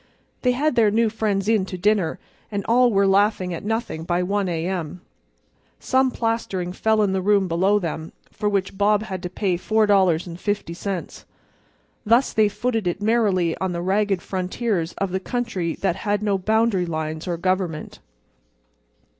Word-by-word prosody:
They 250 -1 +2
had 295 +4 +1
their 225 -4 +4
new 220 +1 +2
friends 210 -3 -1
in 220 -3 +3
to 185 - -5
dinner 195 -3 +1 0.3
and 200 -2 -3
all 245 +1 +4
were 200 -1 +3
laughing 195 -2 +2
at 165 - -6
nothing 220 -6 -3
by 175 +1 0
1 200 0 0
A. 165 -1 -2
M. 180 -2 -4 0.8
Some 260 0 +2
plastering 225 -7 -2
fell 220 +2 +2
in 200 - +1
the 190 - 0
room 200 0 +3
below 185 +5 +2
them, 160 -4 -4 0.2
for 210 - -1
which 195 -2 -1
Bob 210 +1 +3
had 190 -4 -5
to 180 - -4
pay 185 -1 -1
$4.50. 190 -2 0 0.8
Thus 235 +4 +3
they 215 -1 +4
footed 225 -2 -2
it 175 +2 -1
merrily 205 -6 +2
on 190 -1 -1
the 170 - -3
ragged 195 0 +1
frontiers 185 -1 -2
of 195 -2 -3
the 190 - -1
country 195 -6 -2
that 190 -2 -1
has 205 +1 -1
no 200 -2 +1
boundary 215 -2 +1
lines 160 +1 -4
or 175 -1 -1
government. 180 -3 -2
195 Hz, 165 wpm, -23 LUFS, 180-215 Hz, 0.8 s, their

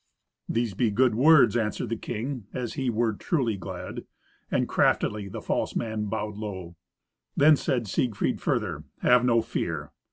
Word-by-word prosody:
"These 115 -3 0
be 115 +4 +1
good 120 +4 +3
words," 140 +3 +6
answered 115 0 -1
the 115 - -1
king, 120 +1 -5
as 125 -3 -3
he 135 -3 -1
were 115 -1 +1
truly 120 - -1
glad, 95 - -7 0.5
and - - +1
craftily 105 -1 +1
the 95 - -7
false - - -1
man 110 -2 -2
bowed 105 0 -3
low. 95 -5 -6 0.6
Then 150 +2 +7
said 120 -5 -1
Siegfried 110 +1 -1
further, - - -1 0.2
"Have 125 0 +5
no 115 -2 +3
fear." 80 -9 -3
115 Hz, 155 wpm, -26 LUFS, 105-125 Hz, 0.6 s, Then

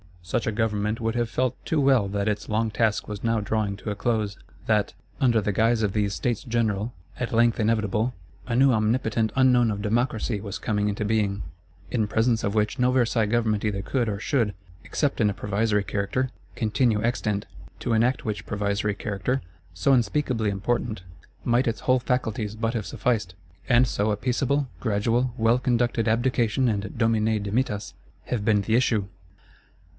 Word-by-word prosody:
Such 85 - -2
a - - +2
Government 105 0 -1
would 115 0 0
have 120 -1 0
felt 130 +2 -1
too 160 - 0
well 135 -7 +4
that 100 +1 -2
its 105 -1 -2
long 110 +1 0
task 110 -1 +1
was 105 -1 -6
now 115 -1 +2
drawing 105 -1 -1
to 105 - -5
a - - -3
close; 105 -2 -1 0.3
that, 105 -2 +1 0.3
under 120 -4 +3
the 105 - 0
guise 115 +2 +2
of 100 -2 0
these 105 -2 0
States 120 -3 -1
General, 115 -2 -1 0.3
at 125 - -3
length 115 0 +3
inevitable, 110 +1 +1 0.3
a 115 - -1
new 135 +2 +5
omnipotent 110 0 +1
Unknown 125 -3 +4
of 100 -1 -2
Democracy 110 0 0
was 100 0 -5
coming 105 -1 0
into 105 +1 -2
being; 105 -2 0 0.5
in 110 -4 +1
presence 115 +2 +1
of 100 0 -1
which 105 +2 0
no 125 0 +3
Versailles 120 -3 +2
Government 110 -2 +1
either 100 -2 -1
could 120 +4 -1
or 100 -2 -2
should, 110 -4 0 0.3
except 145 -5 -1
in 105 - +4
a - - -1
provisory 105 0 0
character, 115 +6 -1 0.3
continue 110 0 +1
extant. 105 -4 -1 0.4
To 120 - 0
enact 120 +4 +2
which 105 -2 -4
provisory 105 0 -1
character, 105 +7 -2 0.3
so 90 +11 +1
unspeakably 120 -2 +1
important, 105 0 -2 0.4
might 120 +1 +2
its 115 - -1
whole 130 0 +3
faculties 110 -4 -2
but 115 +1 -1
have 110 -4 -2
sufficed; 105 -8 -1 0.3
and 125 +1 +6
so 110 -3 0
a 105 - 0
peaceable, 130 +4 0
gradual, 115 +3 0
well 115 +2 +3
conducted 120 -2 +1
Abdication 120 +1 +2
and 100 -2 -3
Domine 110 -2 +2
dimittas 105 -1 -1 0.3
have 110 -4 -2
been 105 -2 +3
the 110 +3 +1
issue! 115 -5 +2
110 Hz, 175 wpm, -25 LUFS, 105-120 Hz, 0.5 s, and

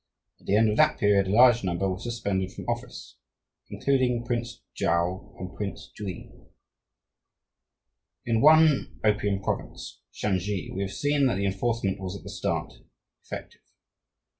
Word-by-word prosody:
At - - -21
the 100 - +3
end 110 0 +4
of 105 - -2
that 155 0 +4
period 100 -2 +3
a 100 - +1
large 120 -1 +6
number 95 +1 -1
were 95 -1 -2
suspended 100 -6 -2
from - - -9
office, 120 +1 -5 0.5
including 125 -3 +1
Prince 120 0 -3
Chuau 85 +3 -1
and 90 0 -8
Prince 100 -2 -6
Jui. 100 -4 -7 1.9
In 115 -1 +1
one 155 -1 +5
opium 105 -2 +1
province, - - -5
Shansi, 95 -1 -2
we 95 - -3
have 100 -1 -3
seen 145 +1 +2
that 125 - +1
the 100 +1 -1
enforcement 100 0 -1
was 95 0 -5
at - - -15
the - - -8
start - - -2 0.5
effective. - - -9
105 Hz, 145 wpm, -27 LUFS, 95-120 Hz, 1.9 s, large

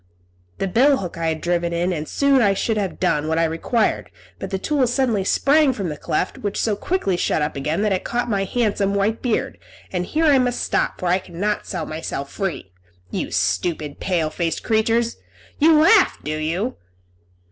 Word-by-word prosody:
The 195 - -1
bill 265 +9 +4
hook 180 -6 -5
I 165 -1 -2
had 160 -1 -2
driven 170 0 0
in, 175 +2 0
and 155 -2 -4
soon 280 -2 +3
I 200 -3 +3
should 225 +3 0
have 195 -3 -3
done 150 +1 +1
what 160 +1 0
I 165 - +3
required; 165 +8 0 0.3
but - - -5
the 195 - -2
tool 270 +5 +1
suddenly 240 -5 +1
sprang 280 +7 +3
from 195 -7 -3
the 150 - -4
cleft, 155 - -2
which 205 -1 -3
so 215 -2 +1
quickly 205 - -1
shut 160 -3 0
up 150 - -3
again 155 +8 -1
that 210 -2 +2
it 185 - -2
caught 245 +1 -2
my 200 -4 0
handsome 200 -2 0
white 205 +3 0
beard; 245 -4 -1 0.3
and 180 -1 -2
here 320 +2 +1
I 285 -3 +5
must 245 -1 0
stop, - - 0
for - - -4
I 180 +2 +3
cannot 195 +4 -3
set 175 -5 -4
myself 155 -3 -5
free. 190 - -4 0.4
You - - -3
stupid, 140 - -1
pale 165 -5 0
faced 165 +1 -2
creatures! 225 +1 +1 0.4
You 310 +1 +6
laugh, 315 - +5
do 155 +1 -2
you?" 170 +10 -2
195 Hz, 195 wpm, -21 LUFS, 165-235 Hz, 0.4 s, You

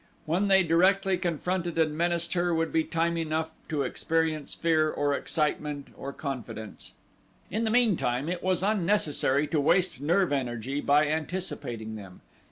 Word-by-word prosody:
When 180 +6 +1
they 190 -1 +6
directly 190 +3 +3
confronted 175 0 -2
and 155 -2 +2
menaced 170 +1 0
her 175 -1 +1
would 165 0 -1
be 160 - +3
time 170 +1 -1
enough 160 0 -2 0.2
to 150 -3 0
experience 160 -1 -1
fear 160 -2 +2
or 145 -1 0
excitement 150 -1 -2
or 140 - -6
confidence. 130 - -7 0.6
In 220 +4 0
the - - +1
meantime 190 - +2
it 175 0 -3
was 185 -1 0
unnecessary 175 -8 +1
to 155 - +1
waste 180 -1 +2
nerve 175 +2 +2
energy 130 +1 -2
by 145 +2 +4
anticipating 150 - -4
them. 95 -3 -12
160 Hz, 150 wpm, -28 LUFS, 145-180 Hz, 0.6 s, they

